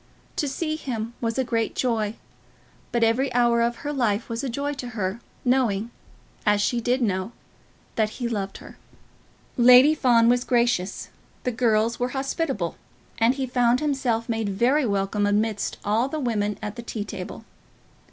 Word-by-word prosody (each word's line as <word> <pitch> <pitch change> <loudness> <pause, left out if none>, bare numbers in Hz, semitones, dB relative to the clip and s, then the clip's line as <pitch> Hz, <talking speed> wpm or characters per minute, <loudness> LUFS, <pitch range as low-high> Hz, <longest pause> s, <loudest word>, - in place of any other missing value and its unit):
To 295 - 0
see 310 +3 -2
him 235 -6 -4
was 230 0 -1
a 265 - +2
great 230 -2 -1
joy. 225 -4 0 0.8
But 235 -1 +1
every 235 +4 +2
hour 235 -1 +4
of 235 +1 +1
her 295 - -1
life 230 -5 0
was 230 +3 -3
a 270 - -2
joy 280 +4 -2
to 265 -3 -6
her, 190 +2 -2 0.3
knowing, 235 -4 +1 0.5
as 210 -1 +3
she 235 +3 +1
did 250 +2 +1
know, 190 +1 -1 0.6
that 215 -1 +2
he 245 -2 -2
loved 200 -4 -3
her. - - -13 0.8
Lady 250 +4 +8
Fawn 240 -6 +4
was 245 +1 +3
gracious, 235 -7 0 0.3
the 250 - 0
girls 225 -1 +1
were 245 +1 0
hospitable, 270 - -2 0.4
and 235 +3 +4
he 270 -1 -2
found 245 -1 +2
himself 265 -6 0
made 225 -3 -1
very 245 +8 +2
welcome 200 0 0
amidst 210 0 0
all 225 +6 +1
the 310 - -3
women 210 -6 -1
at 210 +2 -5
the - - -4
tea 225 -3 -5
table. 195 +3 -7
235 Hz, 165 wpm, -24 LUFS, 215-255 Hz, 0.8 s, Lady